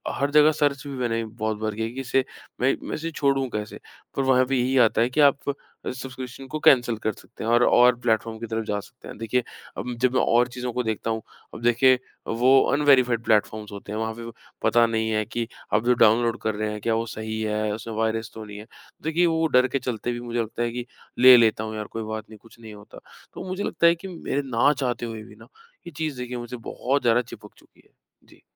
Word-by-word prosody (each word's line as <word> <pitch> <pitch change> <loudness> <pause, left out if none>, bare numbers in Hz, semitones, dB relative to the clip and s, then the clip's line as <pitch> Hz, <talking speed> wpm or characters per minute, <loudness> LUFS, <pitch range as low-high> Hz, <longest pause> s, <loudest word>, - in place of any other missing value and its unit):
हर 140 +1 -1
जगह 150 +1 +6
सर्च 145 -3 0
भी 140 - -6
मैंने 115 -2 -1
बहुत 110 -1 -3
बार 110 -1 -3
की 110 - -5
है 110 - -2
कि 135 - -5
इसे 130 0 +1 0.4
मैं 130 - +3
मैं - - -3
इसे 165 +2 -4
छोड़ूँ 140 -3 +1
कैसे? 105 0 -5 0.4
पर 135 - 0
वहाँ 130 -1 +4
भी 135 0 0
यही 130 +2 +1
आता 115 -2 +4
है 120 - +2
कि 130 - -3
आप 140 0 +3
अ, 140 - -7
सब्सक्रिप्शन 130 0 -8
को 155 +3 -4
कैन्सल 120 -5 +4
कर 110 0 -1
सकते 115 - -12
हैं 115 - -1
और, 120 +1 +5
और 125 0 +5
प्लेटफॉर्म 115 -1 0
की 115 - -5
तरफ 115 0 -2
जा 105 -1 -2
सकते 120 +4 -14
हैं। - - -9
देखिए 115 +2 -1 0.3
अब 125 0 -4
जब 130 0 +2
मैं 130 - +3
और 120 +1 +3
चीज़ों 125 0 -3
को 125 - -1
देखता 110 0 -3
हूँ, 110 - -2 0.3
अब - - -9
देखिए 125 +2 +4 0.3
वो 120 +3 +2 0.2
अनवेरिफाइड 130 -5 +3
प्लेटफ़ॉर्म्स 105 -1 0
होते 100 0 -9
हैं। 110 - -3
वहाँ 110 0 -2
पे 115 +1 -9
वो 115 - -8 0.3
पता 120 0 +4
नहीं 110 -1 -1
है 110 -1 +1
कि 115 +2 -4 0.3
आप 110 +2 +2
जो 125 - +5
डाउनलोड 115 +1 +3
कर 110 -1 -1
रहे 110 0 -2
हैं 105 -1 -6
क्या 115 +1 0
वो 115 +1 -1
सही 110 0 -5
है, 105 0 -1
उसमें 110 +1 -6
वायरस 110 0 -1
तो 110 - -8
नहीं 105 -1 -10
है। 105 - -10 0.4
देखिए 165 +3 +2
वो 165 -1 +1
डर 125 -2 +4
के 135 +2 -2
चलते 120 -1 -3
भी 120 - -4
मुझे 120 0 -3
लगता 115 +1 -4
है 120 - -1
कि 120 0 -5 0.3
ले 125 0 +10
लेता 110 -2 +3
हूँ 110 0 -5
यार 105 -1 -4
कोई 110 - -3
बात 110 0 -6
नहीं, 110 - -12
कुछ 115 0 -19
नहीं 110 -2 -11
होता। 105 0 -13 0.3
तो - - -7
मुझे 185 +2 -3
लगता 170 - +2
है 170 - +5
कि 170 +3 -9
मेरे 165 -5 -3
ना 140 +5 +5
चाहते 125 -4 -2
हुए 110 -2 -6
भी - - -15
ना, - - -16 0.4
ये - - -7
चीज़ 155 -5 -3
मुझसे 120 +1 -6
बहुत 130 +4 -2
ज़्यादा 120 0 +3
चिपक 105 -3 -12
चुकी - - -24
है। - - -29 0.4
जी। - - -20
120 Hz, 245 wpm, -24 LUFS, 110-130 Hz, 0.4 s, ले